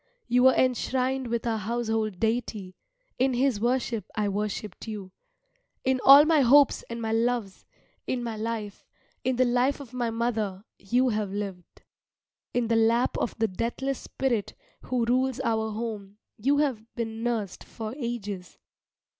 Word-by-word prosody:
You 245 +1 +3
were 260 - +7
enshrined 260 +1 +1
with 235 0 -2
our 225 -2 0
household 220 -2 -2
deity, 220 -5 -2 0.4
in 260 0 +2
his 255 -3 +2
worship 240 -2 0
I 210 -1 0
worshipped 210 0 -4
you. 205 -4 -6 0.7
In 260 -1 +1
all 280 +2 +10
my 315 -1 +4
hopes 275 +2 +5
and 235 0 -5
my 225 -1 -2
loves, 225 -3 -1 0.4
in 250 -1 -1
my 230 -2 -3
life, 215 -2 -4 0.4
in 260 0 +1
the 255 +1 +3
life 250 +4 +2
of 260 -4 -11
my 245 -2 -1
mother 225 -4 -2
you 245 +6 +2
have 210 -3 -1
lived. 195 -3 -6 0.7
In 245 -2 0
the 230 - +2
lap 230 +2 +3
of - - -2
the 225 -1 +2
deathless 240 +7 -3
Spirit 230 -6 -2 0.3
who 250 -2 0
rules 255 +1 +1
our 220 -1 0
home 210 -2 -5 0.2
you 275 +7 +1
have 270 -7 0
been 225 -1 -4
nursed 230 -5 -2
for 220 0 -7
ages. 210 - -5
230 Hz, 155 wpm, -27 LUFS, 215-250 Hz, 0.7 s, all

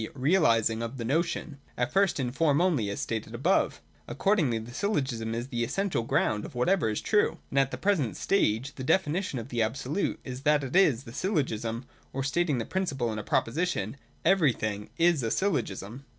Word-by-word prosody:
e. - - -3
realising 125 - +3
of 115 +3 -4
the 115 - -4
notion, 150 +1 -1 0.2
at 125 0 0
first 195 -5 +3
in 125 -2 -1
form 145 +1 +2
only, 160 - +2
as 100 - -4
stated 110 0 -3
above? 165 +11 +1 0.3
Accordingly 170 - +1
the 115 +2 -8
Syllogism 130 - -1
is 120 +3 -4
the 120 -2 -1
essential 175 +5 -1
ground 110 -2 0
of - - -9
whatever 165 +3 +2
is 105 - -2
true: 210 -1 +2
and 140 - +2
at 135 -1 +3
the - - -5
present 170 - 0
stage 135 - +1
the 130 - -7
definition 170 +1 +1
of 115 +1 -6
the 120 -3 -1
Absolute 135 - -1
is 125 0 -6
that 150 0 +3
it 135 +4 -5
is 145 -11 +4
the 115 - -11
Syllogism, 125 - -1 0.3
or 135 - -2
stating 150 0 +1
the 115 - -2
principle 135 -12 -1
in 110 - -4
a - - -5
proposition: 115 - 0 0.3
Everything 120 - +2
is 170 -3 +4
a 115 - -1
Syllogism. 125 - -2
135 Hz, 190 wpm, -28 LUFS, 115-170 Hz, 0.3 s, is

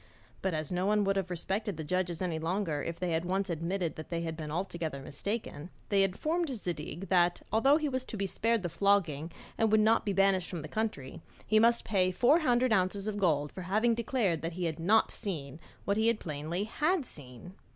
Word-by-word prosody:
But 190 -4 0
as 155 +1 -3
no 180 +1 0
one 210 0 +3
would 195 0 +1
have 190 -2 -1
respected 190 +2 -2
the 160 - -4
judges 180 +2 -1
any 165 -3 -1
longer 165 -2 -1
if 170 +2 -4
they 180 -1 -1
had 165 0 0
once 190 +1 -1
admitted 170 +1 -2
that 155 - -8
they 170 -1 -2
had 165 -1 -3
been 155 -2 -6
altogether 165 -3 -3
mistaken, 165 +3 -5 0.2
they 200 -1 +4
informed 310 - 0
Zadig 175 - -5
that, 175 -1 +3
although 270 +7 +5
he 310 -1 -1
was 260 -2 -2
to 225 - -6
be 200 - -1
spared 225 +3 0
the - - 0
flogging 165 -4 +1 0.3
and 225 -1 +3
would 215 - +5
not 220 +2 +4
be 205 - -1
banished 195 -1 +2
from 175 -4 -4
the - - -6
country, 165 -7 -3 0.2
he 215 - +4
must 235 +1 +4
pay 190 -4 +2
four 245 - +4
hundred 250 -5 +2
ounces 195 +1 +1
of 210 -1 -2
gold 150 -6 +1
for 185 - -7
having 215 +6 +2
declared 225 - 0
he 175 +2 -3
had 160 -1 -2
not 210 +7 +3
seen 155 -7 -5 0.3
what 200 +1 +1
he 225 +1 +4
plainly 160 0 -4
had 305 - 0
seen. 145 - -11
185 Hz, 210 wpm, -31 LUFS, 165-215 Hz, 0.3 s, although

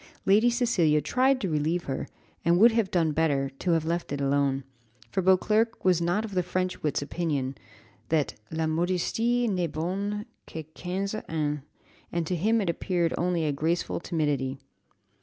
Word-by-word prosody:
Lady 210 +5 +5
Cecilia 225 -11 +2
tried 255 - +2
to 195 - -1
relieve 160 +2 0
her; 135 -1 -3 0.4
she 170 - 0
would 200 +8 +7
have 225 -4 +1
done 165 -3 +2
better 145 -3 +1
to 175 - +1
have 160 -1 +1
let 170 -1 -2
it 140 - -2
alone, 140 -1 +1 0.5
for 190 - +1
Beauclerc 210 +5 +2
was 180 -2 +4
not 175 +6 +1
of 210 - -8
the 185 - +2
French 185 +1 -2
wit's 150 -1 0
opinion 145 -4 -2 0.6
that, 155 -3 +1 0.2
La 160 0 -1
modestie 185 +9 +1
n'est 180 -5 0
bonne 200 +6 -2 0.2
qu'à 160 -2 -7
quinze 190 +3 -3 0.2
ans, 150 -2 -1 0.5
and 170 -1 -1
to 180 - -1
him 220 +6 +2
it 190 - -1
appeared 170 -1 0
only 175 -2 0
a 150 - +1
graceful 160 +5 -1
timidity. 145 -6 -1
170 Hz, 165 wpm, -27 LUFS, 155-195 Hz, 0.6 s, would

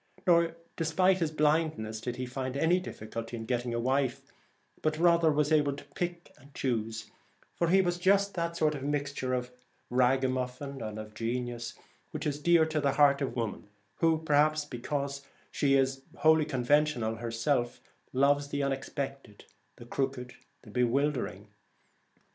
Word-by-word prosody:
Nor 170 -2 +4 0.2
despite 185 +4 +2
his 165 -3 +1
blindness 150 -8 0
did 125 0 -3
he 125 - -4
find 130 +1 -4
any 170 +5 +3
difficulty 115 - -6
in 110 - -6
getting 120 0 -1
a 115 - -1
wife, 130 +1 0 0.6
but 155 0 0
rather 170 -1 +4
was 150 +1 +1
able 145 -2 +3
to 140 - -9
pick 175 -1 -4
and 140 +3 -18
choose, 110 -4 -2 0.4
for 170 - 0
he 190 +3 +5
was 175 -1 -1
just 200 +2 +3
that 160 -4 -1
mixture 140 -3 -1
of 125 0 -3 0.4
ragamuffin 130 +1 0
and 110 -1 -5
of 110 0 -8
genius 120 +1 -3 0.3
which - - -5
is 145 0 -2
dear 170 0 +5
to 155 -1 -1
the 140 -1 +2
heart 140 0 +4
of 140 - -2
woman, 110 -3 -4 0.3
who, 165 -1 +3
perhaps 150 0 +3
be 125 -5 -7
cause 140 +1 -3 0.3
she 140 -1 +2
is 135 0 +1 0.2
wholly 160 -1 +5
conventional 130 -4 +1
herself, 120 +2 -1 0.3
loves 140 +2 +3
the 140 0 -2
unexpected, 135 -4 -4 0.3
the 120 - -12
crooked, 130 0 -3 0.3
the 110 - -13
bewildering. 125 -4 0
140 Hz, 150 wpm, -30 LUFS, 125-155 Hz, 0.6 s, he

